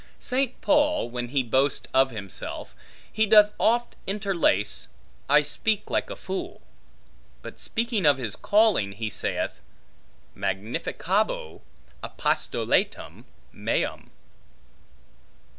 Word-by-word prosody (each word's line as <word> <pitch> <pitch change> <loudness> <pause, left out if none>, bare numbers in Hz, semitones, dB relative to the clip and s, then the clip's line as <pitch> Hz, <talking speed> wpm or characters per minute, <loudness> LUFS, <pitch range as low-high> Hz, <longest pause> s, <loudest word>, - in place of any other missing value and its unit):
St. 260 0 -1
Paul, 295 - +2
when 120 0 -3
he 135 +1 +1
boasts 130 +4 +1
of 130 0 +4
himself, 105 -5 -5 0.4
he 220 0 +2
doth 210 0 +7
oft 240 +1 +2
interlace, 190 - 0 0.4
I 150 +1 +6
speak 210 +8 -1
like - - 0
a - - -5
fool; 190 0 -6 0.8
but - - -9
speaking 225 -6 0
of 145 -2 +5
his 115 -6 -2
calling, 205 - +2
he 110 +1 -4
saith, - - -2 0.8
magnificabo 190 - -2 0.4
apostolatum - - -1 0.3
meum. - - -2
185 Hz, 100 wpm, -26 LUFS, -, 0.8 s, doth